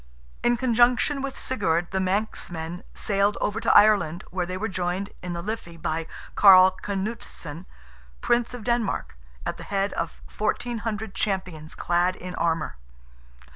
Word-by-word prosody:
In 240 0 +3
conjunction 245 +3 +3
with 275 -1 -4
Sigurd, 175 -8 0
the 190 - 0
Manxmen 180 -3 -2
sailed 200 0 +1
over 205 - -1
to - - +2
Ireland, 195 -5 +4
where 180 -1 -2
they 185 +1 -3
were 215 +4 -2
joined, 185 +1 -2
in 180 -1 -4
the 170 0 -4
Liffey, 200 -5 -5
by 160 0 -2 0.3
Carl 185 -2 +8
Canuteson, 190 -5 -5 0.5
Prince 240 - +1
of 240 - -8
Denmark, 235 - -1 0.3
at - - -3
the - - -8
head 195 0 -1
of - - -4 0.2
1400 220 -1 -2
champions 185 -7 -3
clad 175 +1 +1
in 180 0 -7
armour. 165 - -1
190 Hz, 140 wpm, -25 LUFS, 175-220 Hz, 0.5 s, Carl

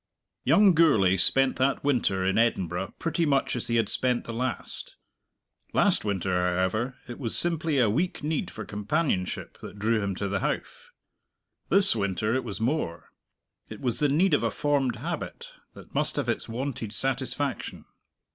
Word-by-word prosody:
Young 200 -2 +5
Gourlay 125 - +4
spent 135 +8 +3
that 135 +2 +1
winter 115 -9 +1
in 95 +3 +2
Edinburgh 95 -5 0
pretty 165 0 -1
much 140 -5 +1
as 125 - -3
he 115 - 0
had 115 -2 +2
spent 125 +2 +2
the 115 - -7
last. 125 +2 -2 0.8
Last - - +3
winter, 95 -3 -1
however, 95 +7 0
it 120 - -8
was 115 -5 -1
simply 165 -3 +1
a 120 -4 +4
weak 150 - -1
need 150 0 -1
for 110 - -8
companionship 105 - -2
that - - -10
drew 110 +2 +1
him 100 -2 -2
to 100 - -3
the 100 +1 -1
Howff. 480 - -4 0.8
This 195 -8 +5
winter 105 +1 -1
it 130 0 0
was 110 -4 -6
more: 115 - -2 0.6
it - - -8
was 125 -3 -2
the 150 - +2
need 170 +8 +3
of - - +4
a - - +1
formed 140 -5 0
habit - - -6 0.2
that - - -14
must - - +1
have - - -2
its - - -2
wonted 120 -2 -4
satisfaction. 135 +1 -2
120 Hz, 165 wpm, -27 LUFS, 100-145 Hz, 0.8 s, Young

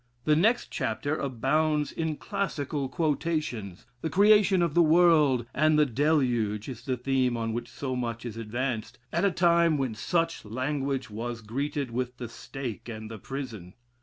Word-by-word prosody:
The 150 - +4
next 220 +10 +2
chapter 145 +7 -1
abounds 150 +3 0
in 160 -2 -2
classical 150 - -3
quotations, 150 - -2 0.2
the 160 - -2
Creation 200 -1 +5
of 170 -3 0
the 175 - +5
world 155 -6 +5
and 155 +1 +3
the 150 - +5
Deluge 120 -6 +1
is 120 -3 -7
the 130 -2 -1
theme 125 -1 +1
on 115 -1 -2
which 120 - -4
so 130 -2 -4
much 120 -1 -3
is 115 -3 -5
advanced, 115 +1 -3 0.2
at 170 +4 +2
a - - +5
time 170 -2 +3
when 130 -4 -1
such 165 - -1
language 135 +2 -2
was 115 +2 -4
greeted 135 +3 -3
with 125 +1 -3
the 120 -2 -6
stake 120 -1 -7
and 110 -1 -7
the 110 - -7
prison. 115 -9 -7
135 Hz, 165 wpm, -28 LUFS, 120-155 Hz, 0.2 s, Creation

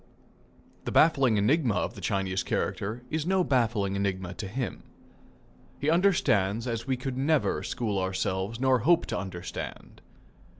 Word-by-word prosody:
The - - -2
baffling 135 -8 +4
enigma 125 +2 +2
of 90 - -1
the - - -10
Chinese 95 -1 -1
character 110 +6 -2
is 160 +1 -1
no 190 0 +3
baffling 115 - +1
enigma 95 -2 -2
to 100 - -6
him. 120 +5 -4 1.0
He 145 +2 0
understands 115 - +2
as 115 0 -3
we 130 -1 0
could 130 0 -4
never 150 +2 +1
school 105 -5 -2
ourselves 95 +3 -2
nor 130 -1 +3
hope 170 +8 +3
to 110 - -3
understand. 95 -2 -7
115 Hz, 140 wpm, -28 LUFS, 100-135 Hz, 1.0 s, baffling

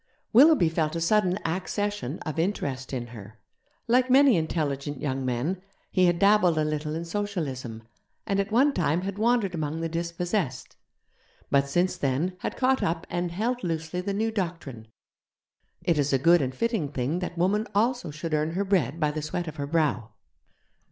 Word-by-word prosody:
Willoughby 275 - +7
felt 160 0 -1
a - - -1
sudden 185 +1 +2
accession 190 - -2
of 155 0 -4
interest 140 -8 -2
in 125 -3 -3
her. 105 0 -11 0.5
Like 250 +2 +3
many 270 -1 +6
intelligent 145 -4 -2
young 135 -2 -2
men, 130 +9 -2 0.3
he 185 -1 +4
had 175 -1 +2
dabbled 195 -3 +4
a 155 - +2
little 150 0 -2
in 165 +1 -4
Socialism, 155 - -4 0.4
and 195 0 0
at 200 +1 -1
one 270 +6 +4
time 165 - +1
had 195 +2 -5
wandered 230 -4 +2
among 155 -1 -3
the 165 - -1
dispossessed; 170 - -3 0.8
but 140 0 +3
since 175 +5 +1
then, 145 +7 -1
had - - -4
caught 260 0 +2
up 165 0 -1
and 175 0 -1
held 240 +7 -2
loosely 165 +1 -2
the 200 +2 -3
new 220 +3 0
doctrine 165 - -4 1.0
it 170 -4 +2
is 145 0 +1
a 135 - +4
good 170 +5 +5
and 130 -1 -2
fitting 220 - -1
thing 140 +6 -1
that 180 -1 -5
woman 205 +5 +1
also 235 -2 +1
should 155 +2 -5
earn 155 +1 0
her 200 +3 -1
bread 185 -5 +1
by 150 -2 +1
the 155 +1 -4
sweat 165 +3 -3
of 155 - -7
her 140 -1 -3
brow. 150 -8 0
170 Hz, 180 wpm, -26 LUFS, 150-200 Hz, 1.0 s, Willoughby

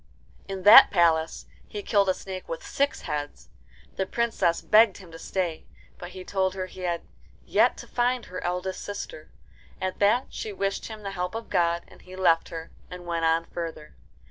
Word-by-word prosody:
In 195 -1 -5
that 205 - +10
palace 165 -3 +2 0.2
he 205 -1 -6
killed 200 -2 +2
a 185 - +2
snake 185 -1 -8
with 165 - -5
six 280 +1 -1
heads. 150 -2 -5 0.5
The 190 - -1
Princess 230 -8 +1
begged 215 -2 +5
him 185 -4 -13
to 165 - -10
stay; 175 -2 -3 0.3
but 175 - -7
he 185 0 -9
told 190 0 -1
her 185 -1 -3
he 185 - -13
had 175 -2 -2 0.4
yet - - +3
to - - -10
find 245 0 0
her 185 - -7
eldest 180 +1 -3
sister. 205 - -7 0.5
At 185 0 -3
that 215 +6 +3
she 215 - -6
wished 195 0 -2
him 215 -2 -9
the 200 - -4
help 180 +1 -3
of 225 0 -6
God, 170 0 +1
and - - -18
he 185 0 -12
left 170 -3 +3
her, 165 -1 -7 0.2
and 180 -1 -9
went 170 -1 -1
on 165 +1 +2
further. 165 -3 -7
185 Hz, 190 wpm, -26 LUFS, 170-200 Hz, 0.5 s, that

